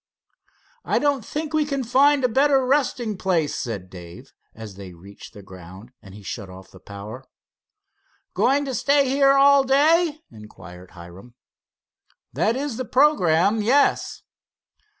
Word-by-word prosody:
"I -, -, -1 dB
don't 285 Hz, -4 st, 0 dB
think 305 Hz, +5 st, -6 dB
we 310 Hz, -1 st, +2 dB
can 275 Hz, -2 st, -3 dB
find 270 Hz, +4 st, +2 dB
a -, -, +4 dB
better 270 Hz, +2 st, +2 dB
resting 250 Hz, -6 st, -1 dB
place," 170 Hz, -6 st, -1 dB
said 100 Hz, -7 st, -6 dB
Dave, 85 Hz, -1 st, -13 dB, 0.2 s
as 110 Hz, -2 st, -10 dB
they 95 Hz, -2 st, -11 dB
reached 100 Hz, +6 st, -15 dB
the 100 Hz, -, -12 dB
ground 95 Hz, +4 st, -14 dB
and 95 Hz, 0 st, -14 dB
he 105 Hz, -, -13 dB
shut 100 Hz, 0 st, -7 dB
off 95 Hz, +1 st, -14 dB
the 95 Hz, -, -16 dB
power. 105 Hz, +6 st, -10 dB, 1.1 s
"Going 285 Hz, +2 st, +1 dB
to 265 Hz, -, -5 dB
stay 280 Hz, +2 st, +1 dB
here 275 Hz, +1 st, +3 dB
all 275 Hz, 0 st, +5 dB
day?" 310 Hz, +4 st, +2 dB
inquired 90 Hz, -4 st, -14 dB
Hiram. 90 Hz, +8 st, -14 dB, 1.0 s
"That 190 Hz, -, 0 dB
is 270 Hz, -3 st, -4 dB
the 255 Hz, -, -4 dB
programme, 215 Hz, -, +2 dB
yes." 265 Hz, +7 st, 0 dB
220 Hz, 145 wpm, -22 LUFS, -, 1.1 s, all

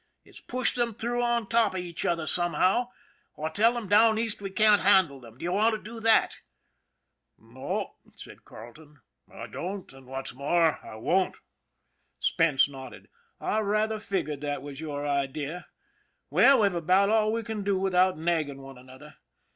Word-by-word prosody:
It's -, -, -15 dB
push 255 Hz, 0 st, -1 dB
them 240 Hz, -3 st, -1 dB
through 240 Hz, +2 st, -2 dB
on 235 Hz, -1 st, 0 dB
top 230 Hz, -3 st, +2 dB
of 185 Hz, -, -2 dB
each 175 Hz, -2 st, -5 dB
other 165 Hz, -2 st, 0 dB
somehow, 180 Hz, +8 st, +1 dB, 0.5 s
or 155 Hz, +1 st, -4 dB
tell 225 Hz, +8 st, +3 dB
them 235 Hz, -4 st, -5 dB
down 220 Hz, +2 st, +5 dB
East 225 Hz, -2 st, -2 dB
we 195 Hz, -, -4 dB
can't 210 Hz, +2 st, +4 dB
handle 190 Hz, -8 st, +4 dB
them. 115 Hz, -2 st, -15 dB
Do -, -, -11 dB
you 175 Hz, -, -1 dB
want 220 Hz, +4 st, +2 dB
to -, -, -6 dB
do 225 Hz, +2 st, -9 dB
that? 225 Hz, 0 st, +3 dB, 0.3 s
" -, -, -51 dB, 0.2 s
" -, -, -55 dB
No," -, -, -6 dB, 0.2 s
said -, -, -13 dB
Carleton, 145 Hz, +5 st, -14 dB, 0.2 s
" -, -, -33 dB
I -, -, -8 dB
don't; 190 Hz, -3 st, -7 dB
and 135 Hz, -1 st, -16 dB
what's 135 Hz, 0 st, -6 dB
more, 160 Hz, +5 st, +1 dB
I -, -, -10 dB
won't." 180 Hz, +12 st, 0 dB, 0.8 s
Spence 160 Hz, -6 st, +2 dB
nodded. 135 Hz, -2 st, -11 dB, 0.2 s
" -, -, -48 dB
I 215 Hz, -, -1 dB
rather 215 Hz, +1 st, 0 dB
figured 190 Hz, -9 st, -3 dB
that 145 Hz, -2 st, -4 dB
was 145 Hz, 0 st, -8 dB
your 145 Hz, -2 st, -5 dB
idea. 145 Hz, +4 st, -3 dB, 0.6 s
Well, 275 Hz, -4 st, +5 dB
we've 200 Hz, -3 st, +2 dB
about 185 Hz, +4 st, +2 dB
all 215 Hz, -1 st, +2 dB
we 230 Hz, +1 st, -2 dB
can 220 Hz, -2 st, -5 dB
do 200 Hz, -1 st, 0 dB
without 185 Hz, -1 st, +2 dB
nagging 155 Hz, -4 st, -2 dB
one 135 Hz, -1 st, -12 dB
another. 130 Hz, +4 st, -15 dB
180 Hz, 180 wpm, -27 LUFS, 145-215 Hz, 0.8 s, down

